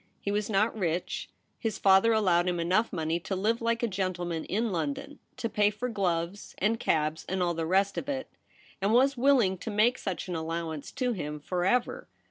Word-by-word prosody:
He 200 Hz, -, -3 dB
was 210 Hz, +1 st, -1 dB
not 215 Hz, +2 st, +2 dB
rich; 175 Hz, -4 st, -2 dB, 0.3 s
his 225 Hz, -4 st, -2 dB
father 195 Hz, +3 st, +5 dB
allowed 185 Hz, -5 st, +3 dB
him 175 Hz, -1 st, 0 dB
enough 185 Hz, +7 st, +1 dB
money 165 Hz, -1 st, -1 dB
to 190 Hz, +3 st, -4 dB
live 220 Hz, +5 st, 0 dB
like 230 Hz, 0 st, 0 dB
a -, -, +3 dB
gentleman 180 Hz, -4 st, -2 dB
in 220 Hz, +3 st, -1 dB
London, 165 Hz, -, -3 dB, 0.2 s
to 230 Hz, -, -2 dB
pay 210 Hz, -2 st, +3 dB
for 215 Hz, +4 st, -4 dB
gloves 180 Hz, -3 st, -2 dB
and 220 Hz, +3 st, +1 dB
cabs 155 Hz, 0 st, 0 dB
and 190 Hz, 0 st, 0 dB
all 175 Hz, -1 st, +1 dB
the 165 Hz, -1 st, -2 dB
rest 195 Hz, +3 st, +2 dB
of 280 Hz, -, -7 dB
it, 265 Hz, -2 st, -2 dB, 0.5 s
and 200 Hz, +3 st, +2 dB
was 270 Hz, +3 st, +4 dB
willing 240 Hz, -8 st, +3 dB
to -, -, -5 dB
make 220 Hz, +4 st, +3 dB
such 190 Hz, -1 st, -4 dB
an 180 Hz, -, -4 dB
allowance 160 Hz, -2 st, -4 dB
to 250 Hz, -2 st, 0 dB
him 150 Hz, -6 st, -5 dB
for 175 Hz, +4 st, -2 dB
ever. 245 Hz, +5 st, 0 dB
195 Hz, 200 wpm, -29 LUFS, 170-225 Hz, 0.5 s, father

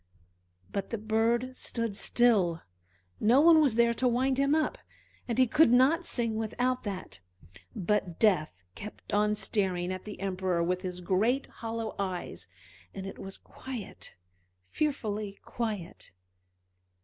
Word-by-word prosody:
But 195 Hz, -1 st, -3 dB
the 230 Hz, -, -2 dB
bird 225 Hz, +4 st, 0 dB
stood 230 Hz, -4 st, -2 dB
still, 200 Hz, -9 st, +2 dB, 0.6 s
no 235 Hz, +5 st, +5 dB
one 320 Hz, +1 st, +7 dB
was 275 Hz, -7 st, +3 dB
there 235 Hz, 0 st, +4 dB
to 250 Hz, +2 st, +1 dB
wind 260 Hz, +2 st, +1 dB
him 275 Hz, +2 st, +3 dB
up, 315 Hz, -1 st, 0 dB, 0.5 s
and 235 Hz, -, -2 dB
he 260 Hz, -, +6 dB
could 300 Hz, +1 st, +4 dB
not 275 Hz, +8 st, +4 dB
sing 230 Hz, -2 st, 0 dB
without 245 Hz, +3 st, -1 dB
that; 195 Hz, -, -5 dB, 0.6 s
but 195 Hz, -3 st, -1 dB
Death 155 Hz, -, +2 dB
kept 210 Hz, -, -9 dB
on 210 Hz, +1 st, +3 dB
staring 185 Hz, -4 st, 0 dB
at 185 Hz, -, -7 dB
the 210 Hz, -, -8 dB
Emperor 185 Hz, -3 st, -1 dB
with 180 Hz, +1 st, 0 dB
his 180 Hz, -1 st, -5 dB
great 220 Hz, +10 st, +1 dB
hollow 225 Hz, -1 st, -5 dB
eyes, 185 Hz, -3 st, -4 dB, 0.5 s
and 195 Hz, -1 st, -5 dB
it 195 Hz, -, -8 dB
was 195 Hz, 0 st, -6 dB
quiet, 255 Hz, -5 st, -8 dB, 0.6 s
fearfully 215 Hz, -9 st, -2 dB
quiet. 215 Hz, -7 st, -4 dB
220 Hz, 135 wpm, -29 LUFS, 195-245 Hz, 0.6 s, one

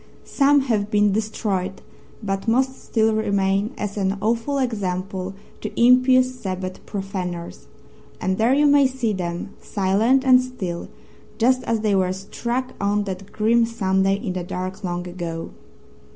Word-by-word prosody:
Some 285 Hz, 0 st, +4 dB
have 215 Hz, -6 st, 0 dB
been 210 Hz, -1 st, +3 dB
destroyed, 200 Hz, -3 st, -2 dB, 0.4 s
but 195 Hz, +1 st, -3 dB
most 260 Hz, +3 st, +1 dB
still 220 Hz, -1 st, +2 dB
remain 200 Hz, -1 st, +1 dB
as 205 Hz, 0 st, -4 dB
an 195 Hz, 0 st, 0 dB
awful 230 Hz, +6 st, 0 dB
example 195 Hz, -6 st, -2 dB, 0.3 s
to -, -, -5 dB
impious 255 Hz, +1 st, +5 dB
Sabbath 185 Hz, -3 st, -5 dB
profaners. 185 Hz, -4 st, -5 dB, 0.5 s
And 190 Hz, +2 st, -1 dB
there 235 Hz, +4 st, +4 dB
you 295 Hz, +1 st, +4 dB
may 285 Hz, -1 st, +6 dB
see 250 Hz, -4 st, -1 dB
them 175 Hz, -2 st, -4 dB
silent 215 Hz, +7 st, +2 dB
and 255 Hz, -1 st, +7 dB
still, 190 Hz, -9 st, -5 dB, 0.5 s
just 255 Hz, +2 st, +3 dB
as 225 Hz, -2 st, 0 dB
they 215 Hz, -2 st, +1 dB
were 185 Hz, -1 st, +2 dB
struck 235 Hz, +6 st, -4 dB
on 205 Hz, +1 st, +1 dB
that 195 Hz, 0 st, -6 dB
grim 230 Hz, +2 st, +3 dB
Sunday 195 Hz, -3 st, +1 dB
in 200 Hz, -2 st, -4 dB
the 180 Hz, -1 st, -3 dB
dark 185 Hz, +3 st, -5 dB
long 175 Hz, -1 st, -3 dB
ago. 170 Hz, -2 st, -5 dB
205 Hz, 145 wpm, -22 LUFS, 190-235 Hz, 0.5 s, and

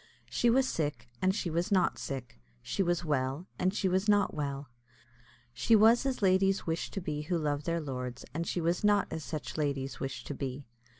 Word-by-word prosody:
She 240 Hz, -, +3 dB
was 260 Hz, +2 st, +4 dB
sick, 150 Hz, -, -2 dB
and 190 Hz, +1 st, +3 dB
she 175 Hz, -, -2 dB
was 170 Hz, +6 st, -1 dB
not 190 Hz, -2 st, +3 dB
sick; 130 Hz, -, -6 dB, 0.2 s
she -, -, -1 dB
was 175 Hz, -1 st, +1 dB
well, 140 Hz, +2 st, -1 dB
and 185 Hz, +1 st, +2 dB
she 195 Hz, -1 st, 0 dB
was 190 Hz, +3 st, +1 dB
not 205 Hz, -1 st, +4 dB
well; 140 Hz, -2 st, -3 dB, 0.9 s
she 120 Hz, -, +4 dB
was 225 Hz, +5 st, +6 dB
as 255 Hz, -5 st, -2 dB
ladies 195 Hz, +1 st, +3 dB
wish 165 Hz, 0 st, -2 dB
to -, -, -4 dB
be 150 Hz, -5 st, -3 dB
who 170 Hz, +3 st, -1 dB
love 145 Hz, -2 st, -1 dB
their 170 Hz, 0 st, 0 dB
lords, 125 Hz, -4 st, -5 dB
and 165 Hz, +2 st, -2 dB
she 175 Hz, -, -1 dB
was 170 Hz, +3 st, 0 dB
not 205 Hz, -1 st, +4 dB
as 160 Hz, -, -4 dB
such 140 Hz, -6 st, -5 dB
ladies 140 Hz, -3 st, -1 dB
wish 135 Hz, -, -4 dB
to -, -, -5 dB
be. 135 Hz, 0 st, -5 dB
165 Hz, 200 wpm, -31 LUFS, 140-190 Hz, 0.9 s, was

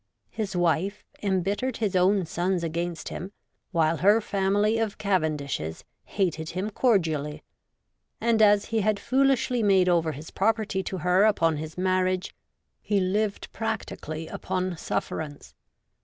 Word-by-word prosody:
His 200 Hz, -4 st, -4 dB
wife 175 Hz, +4 st, 0 dB, 0.2 s
embittered 200 Hz, +6 st, 0 dB
his 210 Hz, -4 st, -1 dB
own 185 Hz, +1 st, +3 dB
sons 175 Hz, +2 st, -1 dB
against 170 Hz, 0 st, -3 dB
him, 185 Hz, +3 st, -6 dB, 0.4 s
while 165 Hz, -2 st, +2 dB
her 205 Hz, +6 st, +5 dB
family 205 Hz, +2 st, +1 dB
of 220 Hz, -3 st, -1 dB
Cavendishes 150 Hz, -, -1 dB, 0.2 s
hated 160 Hz, -5 st, -1 dB
him 190 Hz, +5 st, -3 dB
cordially, 160 Hz, -, +1 dB, 0.8 s
and, 230 Hz, -1 st, +2 dB
as 205 Hz, -1 st, +5 dB
he 220 Hz, -, +3 dB
had 210 Hz, 0 st, +1 dB
foolishly 260 Hz, 0 st, +2 dB
made 195 Hz, -3 st, +4 dB
over 165 Hz, -3 st, +2 dB
his 150 Hz, +3 st, -9 dB
property 215 Hz, -1 st, 0 dB
to 190 Hz, -, -4 dB
her 180 Hz, +4 st, +3 dB
upon 165 Hz, -7 st, +2 dB
his 155 Hz, +2 st, -7 dB
marriage, 185 Hz, 0 st, 0 dB, 0.5 s
he 205 Hz, -2 st, +1 dB
lived 200 Hz, +2 st, -1 dB
practi 225 Hz, -2 st, -3 dB
cally 155 Hz, +1 st, -5 dB
upon 185 Hz, +1 st, -3 dB
sufferance. 155 Hz, -2 st, -4 dB
190 Hz, 135 wpm, -26 LUFS, 165-210 Hz, 0.8 s, her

